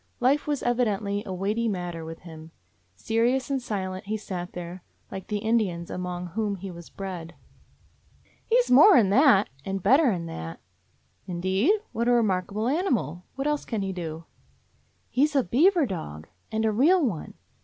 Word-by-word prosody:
Life 275 +5 +2
was 295 -2 -1
evi 245 0 +2
dently 205 0 -2
a - - -4
weighty 205 +5 -1
matter 175 -5 -3
with 165 0 -8
him. 160 -2 -11 0.5
Serious 240 +5 0
and 270 -1 0
silent 190 -5 -4
he 215 +2 -2
sat 180 -4 -6
there, 175 +1 -7 0.3
like 190 -1 -7
the 210 - -1
Indians 205 -6 0
among 180 0 -4
whom 205 +2 -1
he 195 0 -7
was 170 -1 -11
bred. 180 -4 -7 1.1
"He 475 +2 +4
's - - -6
more 310 +10 +8
'n 200 -5 +4
that, 220 -4 +5
and 195 +1 -4
better 270 +7 +5
'n 175 -6 -2
that." 80 - -7 0.7
"Indeed? 190 - +1
What 235 +1 -1
a 245 - +4
remarkable 210 -1 +1
animal! 250 - -1
What 270 +1 -3
else 295 -1 0
can 220 -4 -3
he 190 -1 -3
do?" 165 -2 -6 0.8
"He 275 +4 +3
's 295 - -11
a 270 - +4
beaver 335 +6 +4
dog; 80 - -6 0.2
and 220 0 0
a 220 - +3
real 305 - +4
one. 180 -11 -4
205 Hz, 175 wpm, -26 LUFS, 180-250 Hz, 1.1 s, more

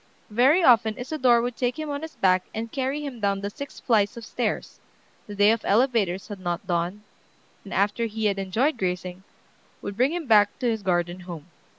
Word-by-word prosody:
Very 270 - +4
often 230 -5 +5
Isadore 250 -3 +2
would 245 0 -3
take 245 +3 -1
him 310 -1 -4
on 285 0 -3
his 320 0 -8
back 185 -1 +2
and 225 +1 -4
carry 275 +2 -2
him 260 -4 -6
down 200 -2 0
the 200 0 -4
six 280 +6 -8
flights 220 -1 +1
of 230 - -8
stairs, 230 0 -3 0.5
the 205 - -7
day 205 +1 +5
of 225 0 -1
elevators 210 -5 +1
had 205 -3 -7
not 175 +1 -3
dawned, 175 +3 -2 0.6
and 200 - -11
after 205 +5 +1
he 220 0 -4
had 200 -1 +1
enjoyed 225 +9 0
grazing, 180 0 -3 0.6
would 200 - -6
bring 255 +6 +2
him 345 -2 -3
back 210 -4 +4
to 250 - -1
his 225 -2 0
garden 175 -1 0
home. 175 -2 -9
215 Hz, 200 wpm, -25 LUFS, 195-250 Hz, 0.6 s, often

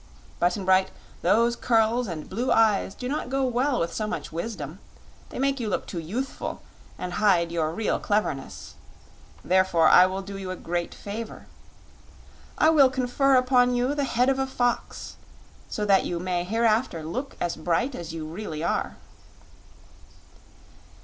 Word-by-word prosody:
Button 180 +2 +1
Bright, 190 0 +4 0.3
those 235 +2 +3
curls 230 +1 +2
and 160 -4 -6
blue 240 +7 -2
eyes 215 -3 +3
do 250 - -5
not 280 -1 -3
go 270 0 0
well 255 +1 +1
with 170 0 -1
so 215 - -2
much - - -5
wisdom. 170 -2 -5 0.5
They - - -8
make 275 +1 0
you 225 -3 -2
look - - -2
too 175 - -5
youthful, 225 - -5 0.3
and 180 -1 -5
hide 175 -4 +3
your 160 -2 0
real 210 +6 -1
cleverness. 205 -10 -2 0.7
Therefore, 185 -3 +3
I 180 - +8
will 190 +1 -4
do 195 0 -7
you 190 -1 -6
a 185 - -3
great 175 -1 -3
favor. 215 +2 -7 1.1
I 315 - +5
will 280 -4 +6
confer 260 +1 +2
upon 250 -1 +4
you 250 +3 +1
the 290 -1 0
head 250 -1 +1
of 270 0 +1
a 265 - 0
fox, 245 -2 -2 0.5
so 210 - -2
that 195 -2 +4
you 175 - -3
may 180 -1 -2
hereafter 225 -3 +1
look 255 - -5
as 175 - -1
bright 235 +11 0
as 170 -6 -6
you 160 -1 -5
really 160 -1 -6
are." 170 - -1
210 Hz, 160 wpm, -25 LUFS, 175-250 Hz, 1.1 s, I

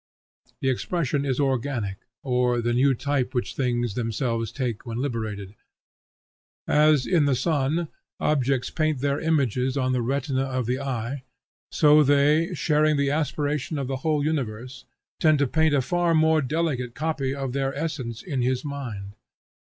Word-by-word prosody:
The 135 - +1
expression 145 0 -1
is 130 -1 -1
organic, 130 -7 -1 0.3
or 125 -2 +1
the 120 0 0
new 130 +2 +3
type 135 0 -1
which 125 - -1
things 120 -4 0
themselves 115 -1 -2
take 125 -6 -3
when 115 -2 -5
liberated. 110 -7 -3 1.1
As, 150 -2 +4
in 170 -5 +3
the 140 -2 +2
sun, 150 +4 0 0.3
objects 135 -3 +1
paint 155 -4 0
their 140 0 0
images 135 -4 +1
on 130 -1 +1
the 125 -1 +1
retina 135 +2 -1
of 130 -2 -2
the 125 +3 -1
eye, 130 -1 -3 0.5
so 150 0 +6
they, 150 +4 +3
sharing 155 -2 +2
the 140 0 +1
aspiration 150 0 -1
of 135 -2 -2
the 135 0 -2
whole 150 +1 0
universe, 130 -4 -3 0.3
tend 155 -3 +4
to 140 - +2
paint 160 +2 +2
a 135 - +2
far 175 +3 +1
more 160 0 +4
delicate 135 -4 -2
copy 145 -3 -2
of 135 -3 -4
their 135 0 0
essence 140 -7 -4
in 140 -8 -2
his 130 +3 0
mind. 120 -9 -5
135 Hz, 155 wpm, -25 LUFS, 125-150 Hz, 1.1 s, so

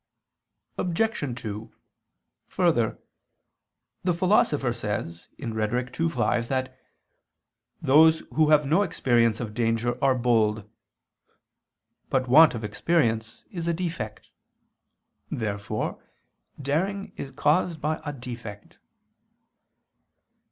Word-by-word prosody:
Obj. 170 - -1
2: 110 0 -6 0.7
Further, - - +1 1.1
the 180 - +2
Philosopher 170 - +2
says 105 -7 -4
(Rhet. 120 +1 -3
ii, 165 0 +2
5) 120 -7 0
that 130 0 -2 1.1
"those 160 +4 +5
who 155 -1 +3
have 150 -1 +5
no 160 +8 +3
experience 120 - +2
of 110 -3 -5
danger 120 +2 -1
are 135 -1 +4
bold." 110 -4 +1 1.4
But 130 -1 +1
want 155 +3 +7
of 115 - -5
experience 115 -1 0
is 170 -3 -4
a 170 - +1
defect. 165 -12 -5 1.0
Therefore 100 -3 -3 0.6
daring 185 +9 -2
is 135 - -6
caused 160 +4 +1
by 155 +2 -2
a 145 - -3
defect. 120 -6 -9
130 Hz, 95 wpm, -26 LUFS, 115-160 Hz, 1.4 s, want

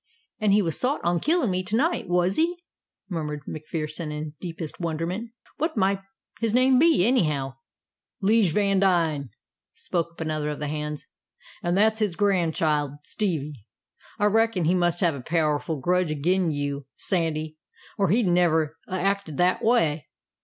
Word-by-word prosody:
"An' 215 - +1
he 205 +1 +4
was 165 -3 0
sot 265 +4 +1
on 175 0 +1
killin' 310 - +1
me 180 0 +1
to 205 +4 -2
night, 290 - 0
was 180 +2 +2
he?" 340 +2 +1 0.5
murmured 150 -5 -4
MacPherson 155 0 -5
in 150 0 -5
deepest 165 -3 -6
wonderment. 170 +6 -3 0.3
"What 315 -2 -2
might 195 0 +2 0.4
his 230 -1 0
name 255 0 +5
be, 320 - +4
anyhow?" 150 - +1 0.6
"'Lije 210 -2 +3
Vandine," 180 -7 +2 0.5
spoke 170 -1 -3
up 170 - -11
another 155 -2 -2
of 150 - -4
the 150 -1 -3
hands. 150 0 -4 0.6
"An' 175 0 0
that's 220 +2 +3
his 205 -6 0
grandchild, 160 -7 +1
Stevie. 160 -8 -2 0.6
I 205 - +1
reckon 220 -4 +2
he 170 - +3
must 175 -1 +1
have 170 -3 +3
a 140 - -6
powerful 155 +1 0
grudge 180 +4 +1
agin 170 +4 +1
you, 145 -2 -3
Sandy, 155 -4 -1 0.4
or 195 -3 +1
he'd 220 +5 +3
never 165 -3 +2
'a' 185 - -4
acted 195 -5 -1
that 180 +1 +2
way." 165 -11 +2
175 Hz, 155 wpm, -25 LUFS, 155-200 Hz, 0.6 s, name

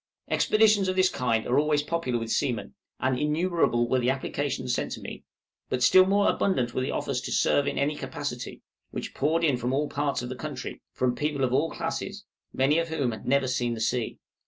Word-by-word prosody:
Expeditions 215 -2 +4
of 185 - 0
this 185 0 +4
kind 120 -5 0
are 125 +3 +3
always 150 -1 +2
popular 150 -7 -1
with 115 -1 -4
seamen, 125 -6 -1 0.3
and 130 -1 0
innumerable 150 -6 +1
were 130 +2 +2
the 125 0 +1
applications 130 -1 -2
sent - - -2
to - - -6
me; - - -8 0.5
but 125 -1 0
still 185 +7 +7
more 200 +1 +3
abundant 125 -11 +1
were - - -1
the 130 - -2
offers - - -2
to - - -5
"serve 145 - +2
in - - -2
any 145 +2 +1
capacity" - - -5 0.3
which - - -6
poured 160 +4 +1
in 145 -6 +3
from 125 +1 -2
all 145 +2 +1
parts 145 -3 -1
of 125 - -5
the 130 - -4
country, 140 0 -6
from 125 -1 0
people 145 +1 -1
of 125 -1 +1
all 150 +5 +2
classes, 195 +5 -4 0.3
many 140 +5 +2
of 165 - -1
whom 145 -6 -1
had 110 - -8
never 140 0 +3
seen 120 -2 0
the - - -7
sea. 115 +1 -1
140 Hz, 210 wpm, -27 LUFS, 125-160 Hz, 0.5 s, still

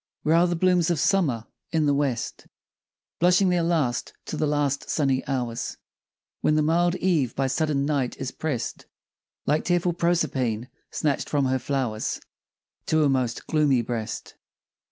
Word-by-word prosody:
Where 155 - +3
are 175 +1 +5
the 175 - 0
blooms 180 0 +3
of 170 -4 +1
Summer? 140 - +2 0.3
In 160 -3 +2
the 145 - +3
west, 140 -4 -2 0.7
Blushing 180 +2 +4
their 180 -1 +2
last 155 -8 0
to - - -4
the 155 - 0
last 145 -1 0
sunny 135 -4 +1
hours. 120 -4 -2 0.6
When 150 - +2
the 155 - +3
mild 175 +3 +2
Eve 160 -11 +1
by 135 - +1
sudden 140 +1 0
Night 140 -4 -1
is 130 -1 -4
prest 145 -7 -4 0.6
Like 150 +2 +2
tearful 175 0 +1
Proserpine, 130 -9 0 0.2
snatch'd 145 -3 -1
from 145 -2 +1
her 130 0 +1
flow'rs 125 -4 -2 0.7
To 155 -1 +3
a 145 - +3
most 130 -3 0
gloomy 145 -6 +2
breast. 115 -2 -4
145 Hz, 155 wpm, -25 LUFS, 130-170 Hz, 0.7 s, are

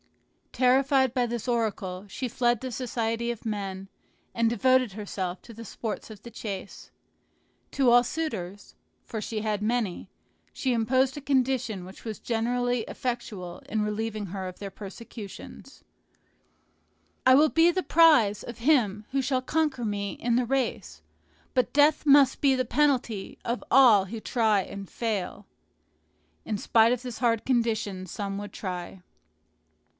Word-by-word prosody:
Terrified 265 0 +3
by 250 -2 +1
this 235 0 -4
oracle, 210 -5 -2
she 255 +6 -4
fled 240 -1 +1
the 260 +1 -5
society 235 -1 -2
of 235 - -9
men, 195 -3 -4 0.5
and 230 -1 +2
devoted 255 -2 +2
herself 190 -3 -4
to 235 - -12
the 230 +1 -9
sports 220 0 -5
of 215 -2 -12
the 235 - -10
chase. 200 -4 -7 0.8
To 265 -3 +3
all 245 0 +7
suitors 210 - -5 0.3
(for 220 -3 -5
she 215 +1 -3
had 210 -1 -1
many) 220 -4 -1 0.4
she 260 -2 -1
imposed 255 +3 +2
a - - -5
condition 255 -7 0
which 190 +2 -12
was 220 -2 -6
generally 245 +1 0
effectual 220 -9 -5
in 215 0 0
relieving 210 0 -3
her 190 +1 -5
of 185 - -8
their 200 -1 -6
persecutions, 205 +1 -10 1.4
"I 260 0 +7
will 305 +3 +5
be 330 +3 +4
the 370 +1 -1
prize 300 -12 +5
of 235 -1 -8
him 230 -6 +2
who 270 0 +1
shall 260 0 0
conquer 275 -3 -1
me 200 -1 -2
in 235 0 -1
the 250 0 +2
race; 265 +1 -2 0.5
but 255 -2 +1
death 295 +2 +4
must 275 -2 +6
be 275 -2 +4
the 255 0 0
penalty 245 -7 0
of 235 +1 -2
all 235 -7 +7
who 220 +4 -6
try 220 -3 +2
and 195 0 -8
fail." 215 -6 -3 1.0
In 210 - -2
spite 225 +2 +4
of 245 0 -1
this 245 -3 -6
hard 230 -2 +1
condition 220 -6 0
some 200 +1 -4
would 205 -1 -7
try. 180 -1 -6
230 Hz, 150 wpm, -27 LUFS, 205-255 Hz, 1.4 s, all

